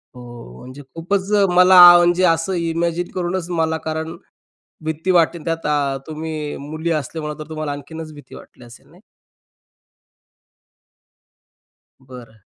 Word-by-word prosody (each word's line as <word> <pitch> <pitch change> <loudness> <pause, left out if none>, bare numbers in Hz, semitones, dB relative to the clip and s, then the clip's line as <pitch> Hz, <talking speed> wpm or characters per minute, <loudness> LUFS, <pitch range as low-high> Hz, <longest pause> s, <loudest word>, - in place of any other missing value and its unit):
हो. 120 - -12
म्हणजे 130 +3 -11
खूपच 190 +4 -2 0.2
मला 180 +1 +7 0.2
म्हणजे 175 +1 +2
असं 165 +2 +1
इमॅजिन 170 0 -2
करूनच 180 -1 -3
मला 160 -2 -1
कारण 160 +1 -4 0.7
भीती 160 +4 -2
वाटते. 170 -1 +2
त्यात 165 0 -3
अ, 145 -2 0
तुम्ही 155 -1 -5
मुली 160 +2 -3
असल्यामुळे 150 0 -4
तर 155 0 -9
तुम्हाला 155 -2 -4
आणखीनच 155 +2 -8
भीती 145 -1 -14
वाटली - - -15
असेल 120 0 -17
नाही. - - -21 3.0
बरं. 125 -4 -14
160 Hz, 120 wpm, -19 LUFS, 150-170 Hz, 3.0 s, मला